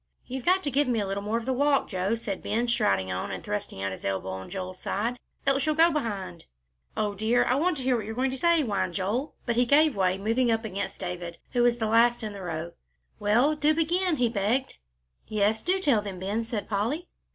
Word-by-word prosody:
"You've 260 0 -6
got 375 +2 +3
to 285 - -1
give 280 +2 +2
me 240 -3 +1
a 205 - 0
little 195 +1 -3
more 210 +3 -1
of 230 - -4
the 260 - 0
walk, 280 +1 +2
Joe," 190 +2 -1
said 210 -4 -4
Ben, 235 +3 -1
striding 95 - +1
on 90 0 -3
and 95 -2 -5
thrusting 105 -2 -4
out 95 - -1
his 95 - -8
elbow 95 -1 -2
on 95 0 -6
Joel's 185 -1 -6
side, 235 +5 -2 0.3
"else 275 0 +2
you'll 310 - +2
go 330 +2 +5
behind." 200 - -4 0.5
"O 210 -1 0
dear! 220 +4 +2
I 245 - +2
want 320 +5 +1
to 265 - -5
hear 255 0 +2
what 220 -3 -3
you're 220 - -5
going 260 +2 +1
to 265 - -4
say," 340 -1 +4
whined 200 -7 -1
Joel. 215 +9 -2
But 235 -1 0
he 245 - +4
gave 300 +2 +5
way, 185 -1 +2
moving 230 +5 +1
up 225 0 +1
against 200 -1 -4
David, 175 -2 -5
who 245 - +1
was 240 0 +3
the 225 - -1
last 230 +2 +3
in 215 -1 -4
the 200 - -8
row. 165 -1 -4 0.5
"Well, 235 +9 +3
do 300 +1 +2
begin," 345 +2 +1
he 245 -4 +2
begged. 230 +4 0 0.5
"Yes, 215 +1 +1
do 370 +3 +1
tell 280 - +2
them, 200 -3 -6
Ben," 200 +5 -2
said 225 -2 -4
Polly. 230 - -1
225 Hz, 235 wpm, -27 LUFS, 195-265 Hz, 0.5 s, go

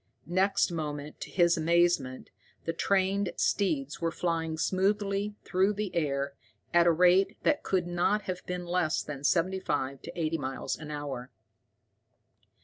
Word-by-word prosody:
Next 190 +2 +2
moment, 150 -2 -4
to - - -6
his 170 -1 +3
amazement, 165 -5 +1 0.3
the 165 - -1
trained 195 +2 +1
steeds 155 -8 0
were 165 - +1
flying 165 -1 -2
smoothly 200 +3 0
through 190 +3 +2
the 205 -2 -3
air, 140 -3 0 0.4
at 175 0 +5
a - - +7
rate 180 +3 +4
that 295 - +2
could 185 -3 0
not 175 +4 +1
have 185 -1 -4
been 180 0 -3
less 175 -2 0
than 145 -2 -7
seventy 185 +5 +2
five 140 -6 -2
to - - -8
eighty 160 0 0
miles 130 -1 -3
an 150 -1 -9
hour. 140 -4 -5
170 Hz, 145 wpm, -29 LUFS, 150-190 Hz, 0.4 s, a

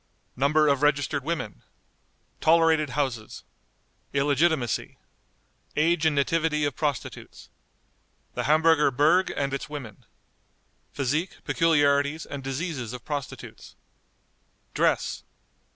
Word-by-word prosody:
Number 150 +4 +3
of 140 -2 +2
Registered 145 -1 +1
Women. 155 -9 -4 0.8
Tolerated 160 -2 +4
Houses. 125 -7 -3 0.7
Illegitimacy. 140 -2 +1 0.8
Age 160 +1 +2
and 155 - +1
Nativity 150 +1 +1
of 145 - -2
Prostitutes. 145 -6 -4 0.8
The - - -3
Hamburger 155 0 +4
Berg 155 +8 +3
and 140 -1 -1
its 140 - -4
Women. 135 -9 -8 0.9
Physique, 150 +6 -2
Peculiarities, 145 -2 +2
and 140 -1 -7
Diseases 135 -3 -4
of 125 -1 -9
Prostitutes. 145 -4 -7 1.0
Dress. - - 0
145 Hz, 95 wpm, -26 LUFS, 140-160 Hz, 1.0 s, Tolerated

